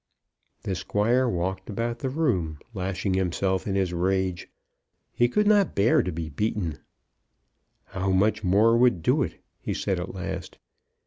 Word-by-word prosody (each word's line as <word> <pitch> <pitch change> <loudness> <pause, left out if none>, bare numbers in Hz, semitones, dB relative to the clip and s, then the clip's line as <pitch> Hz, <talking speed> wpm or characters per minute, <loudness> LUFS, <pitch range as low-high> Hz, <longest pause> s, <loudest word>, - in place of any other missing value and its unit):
The 95 - -2
Squire 115 +7 +1
walked 95 +2 -3
about 115 +3 -2
the 130 - -2
room, 95 - 0 0.2
lashing 95 0 -2
himself 95 +1 0
in 100 - -1
his 95 -2 0
rage. 95 0 0 0.7
He 120 0 +3
could 210 +11 +2
not 205 -3 +3
bear 100 +4 +4
to 90 - -3
be 80 0 -4
beaten. 85 -1 -2 1.1
"How 95 0 -3
much 100 +3 +2
more 105 +5 +4
would 120 -8 +3
do - - +3
it?" - - -4 0.2
he - - -3
said 95 -3 -1
at 90 +2 -6
last. 95 -1 -5
95 Hz, 150 wpm, -26 LUFS, 90-115 Hz, 1.1 s, bear